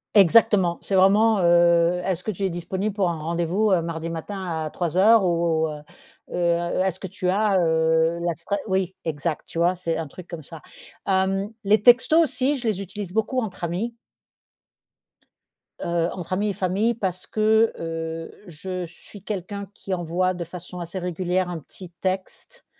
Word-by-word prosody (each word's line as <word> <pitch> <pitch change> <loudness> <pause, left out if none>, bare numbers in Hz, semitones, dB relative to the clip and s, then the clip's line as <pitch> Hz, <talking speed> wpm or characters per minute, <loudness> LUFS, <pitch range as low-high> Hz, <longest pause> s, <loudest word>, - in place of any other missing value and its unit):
Exactement, 190 -2 +5
c'est 195 - -2
vraiment 205 +3 +5
heu: 170 0 +4
«Est-ce 185 -2 -1
que 215 - 0
tu 195 +1 -6
es 190 - +2
disponible 185 +4 -3
pour 190 -3 +1
un 165 - -3
rendez-vous, 170 +6 0
heu, 175 -3 +4
mardi 165 0 -4
matin 190 +4 -5 0.2
à 155 - -3
3:00 190 +7 +4
ou 165 -2 +1
heu, 150 - -6 0.5
heu, 175 +1 +1
est-ce 190 -1 -1
que 190 - -5
tu 185 0 -3
as, 200 +1 +2
heu, 160 0 +2
la 170 0 0
sprea», 170 +5 -3
oui 190 -1 0
exact, 160 0 -2
tu - - -8
vois? 175 +2 +3
C'est 170 -2 -2
un 165 - -3
truc 175 +5 -12
comme 170 -3 -8
ça. 160 +2 -11 0.5
Hem, 195 +1 +1
les 210 +2 +4
textos 255 +8 +6
aussi, 275 0 0
je 245 -3 -4
les 200 -2 0
utilise 195 -1 -7
beaucoup 220 +4 0
entre 205 -7 -5
amis 200 +8 -2 1.8
heu, 170 0 0
entre 180 -1 -5
amis 205 +3 0
et - - -1
famille 195 +6 +1
parce 185 -5 -3
que, 220 +1 +3
heu, 165 0 -4 0.2
je 180 +2 -5
suis 190 +3 -15
quelqu'un 200 0 -5
qui 195 - -6
envoie 180 +1 0
de 175 -1 -4
façon 180 +1 -9
assez 175 +2 -5
régulière 180 +1 -1
un 170 -2 -4
petit 180 +5 -12
texte 190 - -4
185 Hz, 175 wpm, -24 LUFS, 170-200 Hz, 1.8 s, textos